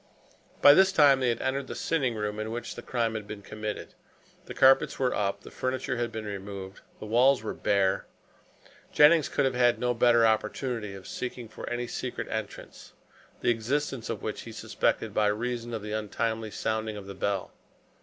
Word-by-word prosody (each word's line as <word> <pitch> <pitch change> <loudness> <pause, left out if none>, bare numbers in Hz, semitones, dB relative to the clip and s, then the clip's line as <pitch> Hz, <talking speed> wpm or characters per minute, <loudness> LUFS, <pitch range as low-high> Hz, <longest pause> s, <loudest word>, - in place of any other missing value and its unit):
By 145 - +10
this 190 +4 +5
time 145 -6 +6
they 130 -2 +1
had 115 - -1
entered 135 +1 -1
the - - -6
sitting 135 -8 0
room 105 0 -3
in 110 0 -3
which 120 +1 -5
the - - -8
crime 115 -2 -1
had 110 -2 -5
been 105 -1 -8
committed. 105 0 -6 0.5
The - - -8
carpets 135 0 +5
were 130 -2 +1
up, 100 -1 -1
the - - -12
furniture 130 0 -2
had 120 -1 -2
been 110 -1 -5
removed, 100 -1 -7 0.2
the - - -7
walls 125 +3 +4
were 110 - -3
bare. 95 -2 +1 0.8
Jennings 150 0 +6
could - - +1
have 130 - +1
had 120 -1 +3
no 125 0 0
better 120 0 +4
opportunity 110 -1 -1
of 95 - -11
seeking 125 -2 -5
for 110 - -8
any 120 0 -2
secret 125 +1 -5
entrance, 110 -2 -7 0.5
the - - +3
existence 125 +2 -2
of - - -4
which - - -4
he - - -9
suspected - - -1
by 105 -1 +2
reason 120 +2 -2
of 110 -3 -4
the 105 - -6
untimely 110 +1 -2
sounding 110 0 -2
of 100 - -8
the 100 - -7
bell. 100 0 -2
115 Hz, 190 wpm, -28 LUFS, 105-125 Hz, 0.8 s, By